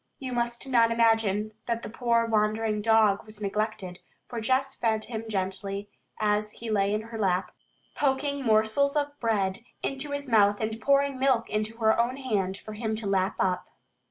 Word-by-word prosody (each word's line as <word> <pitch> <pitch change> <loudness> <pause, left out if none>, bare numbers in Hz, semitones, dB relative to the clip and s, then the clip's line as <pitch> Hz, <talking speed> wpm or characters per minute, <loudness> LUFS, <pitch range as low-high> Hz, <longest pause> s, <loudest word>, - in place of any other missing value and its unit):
You 260 -3 -5
must 240 +1 -1
not 235 -3 +4
imagine 225 -2 +2 0.2
that 235 -1 -1
the - - -5
poor 235 -1 +1
wandering 215 -1 +1
dog 215 -2 +4
was 215 -1 -11
neglected, 200 -3 -3 0.3
for 235 -2 -5
Jess 260 +4 +1
fed 220 -3 0
him 225 -1 -5
gently, 195 0 -3 0.3
as 210 0 +1
he 230 -1 -6
lay 200 -1 +2
in 210 +1 0
her 225 0 -8
lap, 185 -2 +1 0.4
poking 280 0 0
morsels 220 +6 +3
of 290 -1 0
bread 200 -5 0 0.2
into 275 +2 -1
his 285 0 -4
mouth 205 -3 +4
and 220 0 -3
pouring 280 +1 +2
milk 260 -4 +2
into 215 +1 -2
her 220 -1 +3
own 245 +3 +1
hand 200 -8 -1
for 215 - -9
him 220 0 -2
to 220 0 -6
lap 195 0 +1
up. 185 -1 0
220 Hz, 175 wpm, -27 LUFS, 210-240 Hz, 0.4 s, not